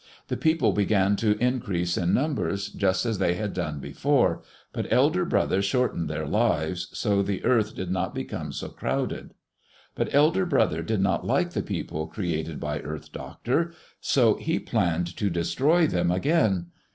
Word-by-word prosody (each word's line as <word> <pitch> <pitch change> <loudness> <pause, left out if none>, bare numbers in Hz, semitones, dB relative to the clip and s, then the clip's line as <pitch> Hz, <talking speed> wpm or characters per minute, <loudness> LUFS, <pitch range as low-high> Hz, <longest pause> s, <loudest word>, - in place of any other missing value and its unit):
The - - 0
people 160 -9 +2
began 100 0 +2
to 105 -1 +2
increase 105 -8 0
in 85 0 +1
numbers, 100 - 0
just 95 +1 0
as 110 -4 -1
they 90 -2 +2
had 105 +1 -3
done 75 -5 -3
before, - - +1 0.3
but - - -4
Elder - - +3
Brother 95 - +1
shortened 100 - 0
their 80 0 -3
lives, 85 +3 0
so 100 -3 +1
the 100 -1 -2
earth 110 -4 +2
did 95 -1 -4
not 95 - -2
become - - -4
so - - -5
crowded. - - -3 0.6
But - - -2
Elder 160 +6 +3
Brother 110 - +2
did 105 +4 -1
not 95 -2 +1
like - - +1
the - - -1
people 80 +1 -4
created 80 -4 -3
by - - -3
Earth 75 -1 -7
Doctor, 165 +8 -2 0.3
so 115 -5 +3
he 160 +2 -1
planned 90 -5 -1
to 100 - 0
destroy 135 - +2
them 90 - +1
again. 95 - +1
100 Hz, 165 wpm, -26 LUFS, 85-125 Hz, 0.6 s, Elder